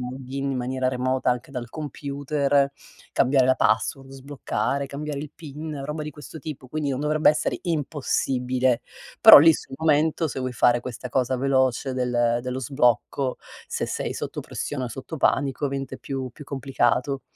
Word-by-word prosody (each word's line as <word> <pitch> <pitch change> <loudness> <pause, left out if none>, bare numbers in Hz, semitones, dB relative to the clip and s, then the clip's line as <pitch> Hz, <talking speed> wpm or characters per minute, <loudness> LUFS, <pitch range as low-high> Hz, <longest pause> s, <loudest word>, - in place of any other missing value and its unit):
log 125 +1 -7
in 135 +1 -2
in - - -2
maniera 130 +1 -1
remota 130 0 0
anche 125 +1 -3
dal 125 -3 -5
computer, 140 -1 0 0.4
cambiare 130 -1 +3
la 130 - +4
password, 115 +5 0
sbloccare, 140 +1 -3
cambiare 145 +1 -5
il 150 0 -6
PIN, 150 -2 -7
roba 150 +2 -4
di 150 - -5
questo 150 +2 -10
tipo. 145 -3 -7
Quindi 150 +1 -2
non 135 0 -2
dovrebbe 150 +1 +4
essere 150 - -1
impossibile. 130 -5 0 0.4
Però - - +12
lì 165 +3 +7
sul 135 - -7
momento, 160 +1 +2
se 135 - -5
vuoi 130 -1 -3
fare 120 +1 +4
questa 125 0 -7
cosa 130 +1 0
veloce 130 -1 +1
del 120 -2 +1
dello 125 +1 -3
sblocco, 130 +1 +1 0.3
se - - -3
sei - - -3
sotto - - -5
pressione 140 -3 -4
o - - -4
sotto 135 +7 -7
panico, 140 -1 +1
avente 135 -1 -3
più 135 -2 -4
più 150 +5 -12
complicato. 135 -1 0
135 Hz, 165 wpm, -24 LUFS, 125-145 Hz, 0.4 s, Però